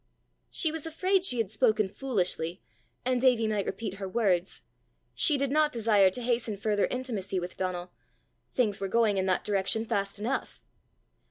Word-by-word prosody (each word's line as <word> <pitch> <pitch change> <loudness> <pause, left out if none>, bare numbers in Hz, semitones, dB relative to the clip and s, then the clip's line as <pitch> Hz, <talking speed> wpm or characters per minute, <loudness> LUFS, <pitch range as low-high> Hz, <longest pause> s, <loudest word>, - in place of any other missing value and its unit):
She 320 - 0
was 320 0 -5
afraid 370 +4 +1
she 250 -10 +3
had 220 -4 -1
spoken 215 -2 +2
foolishly, 185 -7 -2 0.5
and 255 -1 +1
Davie 245 -4 +4
might 210 -2 -1
repeat 195 -1 -4
her 195 -1 -4
words: 190 -5 0 0.5
she 295 - +3
did 275 -1 -1
not 305 0 +3
desire 215 -5 +4
to 240 +6 -6
hasten 230 -3 0
further 205 0 +1
intimacy 215 -7 -3
with 175 +1 -6
Donal; 180 -1 -3 0.6
things 210 -6 +1
were 195 - -1
going 215 -1 +2
in 190 - 0
that 185 - +1
direction 205 +2 0
fast 200 -2 -2
enough! 230 +6 -3
215 Hz, 165 wpm, -29 LUFS, 195-250 Hz, 0.6 s, Davie